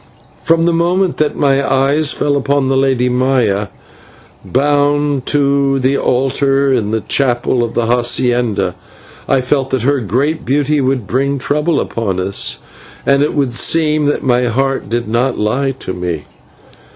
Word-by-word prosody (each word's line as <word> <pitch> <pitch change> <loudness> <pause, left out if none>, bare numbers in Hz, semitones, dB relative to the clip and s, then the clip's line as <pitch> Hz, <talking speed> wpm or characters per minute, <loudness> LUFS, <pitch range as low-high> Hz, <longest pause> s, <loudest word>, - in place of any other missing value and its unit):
From 165 0 +2
the 170 - +2
moment 175 +2 +1
that 155 -1 0
my 140 -1 +1
eyes 140 +3 +2
fell 145 -1 0
upon 140 -1 0
the 135 - +1
Lady 130 -2 +1
Maya 125 -5 +1 0.8
bound 145 0 0
to 140 -1 +1
the 135 +1 +1
altar 135 +1 +1
in 110 -5 0
the 110 0 -1
chapel 120 -1 0
of 115 - -4
the 120 - +1
/hacienda/, 120 -4 +1 0.5
I 135 -1 +2
felt 135 +1 -1
that 130 -3 -1
her 140 +2 +2
great 130 - -1
beauty 145 +2 0
would 130 -4 -1
bring 140 +6 -1
trouble 150 +4 0
upon 100 -5 -3
us, 90 -10 0 0.4
and 140 0 +3
it 150 - 0
would 135 -4 0
seem 155 0 +1
that 145 - -1
my 125 -2 +2
heart 135 +3 -1
did 120 0 -2
not 120 +3 0
lie 125 +6 0
to 95 - -5
me. 90 -1 -4
135 Hz, 155 wpm, -15 LUFS, 120-145 Hz, 0.8 s, and